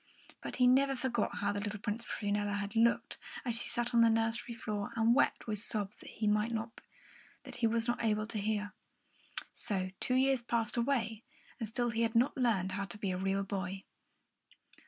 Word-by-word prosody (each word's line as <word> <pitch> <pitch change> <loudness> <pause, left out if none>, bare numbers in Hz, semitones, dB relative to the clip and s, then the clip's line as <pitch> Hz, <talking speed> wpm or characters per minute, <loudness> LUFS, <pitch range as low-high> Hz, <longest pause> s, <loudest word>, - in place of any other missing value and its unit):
But - - -5
he 250 - +4
never 270 +2 +5
forgot 255 -1 -1
how 205 - 0
the 205 - -2
little 205 0 -3
Princess 215 +2 -4
Prunella 205 0 -1
had 200 +1 -4
looked, 230 +1 +2 0.3
as 240 -2 +1
she 230 - 0
sat 240 +1 -1
on 235 - +6
the 230 - +7
nursery 225 +1 0
floor 210 -3 -3
and 230 +1 +4
wept 280 - +2
with 215 -2 0
sobs 205 -2 -2
that - - -12
he 225 +2 -3
was 230 +1 0
not 240 0 0
able 215 -1 +1
to 220 -1 -4
hear. 210 0 -1 0.8
So 185 -4 -2
two 255 - 0
years 265 -1 +3
passed 230 -2 0
away, 235 -3 0 0.4
and 225 - -2
still 240 +1 0
he 225 +1 -1
had 230 0 +1
not 245 +4 +3
learned 220 -8 +1
how 200 +1 -2
to 195 - -9
be 200 -2 -2
a 180 - -2
real 195 +1 0
boy. 195 -1 -4
225 Hz, 185 wpm, -33 LUFS, 205-235 Hz, 0.8 s, the